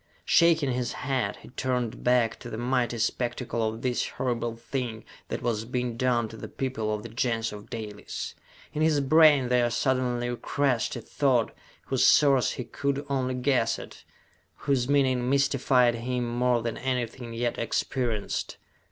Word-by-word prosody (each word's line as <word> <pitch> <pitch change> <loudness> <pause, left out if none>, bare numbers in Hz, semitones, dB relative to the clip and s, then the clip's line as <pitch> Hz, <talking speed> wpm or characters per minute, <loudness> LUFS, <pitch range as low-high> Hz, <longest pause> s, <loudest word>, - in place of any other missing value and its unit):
Shaking 160 -5 +4
his 125 -1 -2
head, 130 -7 -1
he - - -12
turned 125 -2 -2
back 125 -2 +2
to 120 - -8
the 110 - -5
mighty 120 0 0
spectacle 120 +1 -1
of 110 +1 -8
this 125 -1 0
horrible 120 -3 -2
thing 115 -1 -4 0.2
that - - -4
was 115 -3 0
being 125 0 -2
done 120 -2 +1
to 110 - -10
the - - -7
people 125 -5 -3
of 105 0 -3
the 115 - -7
Gens 115 -1 -1
of 105 0 -10
Dalis. 105 -3 -6 0.4
In 150 - -2
his 155 -2 +3
brain 145 -2 +5
there 125 -1 +3
suddenly 120 0 0
crashed 125 -1 0
a - - -5
thought 130 -5 +1 0.3
whose 130 -2 +1
source 140 -4 +5
he 125 - -4
could 140 +3 -2
only 130 -2 0
guess 125 -2 +1
at, - - -11 0.5
whose 135 -3 0
meaning 130 -3 +2
mystified 135 -3 +3
him 120 +1 -2
more 120 0 +1
than 115 - -3
anything 125 -2 -3
yet 120 +1 -1
experienced. 115 -1 -2
125 Hz, 160 wpm, -27 LUFS, 115-130 Hz, 0.5 s, brain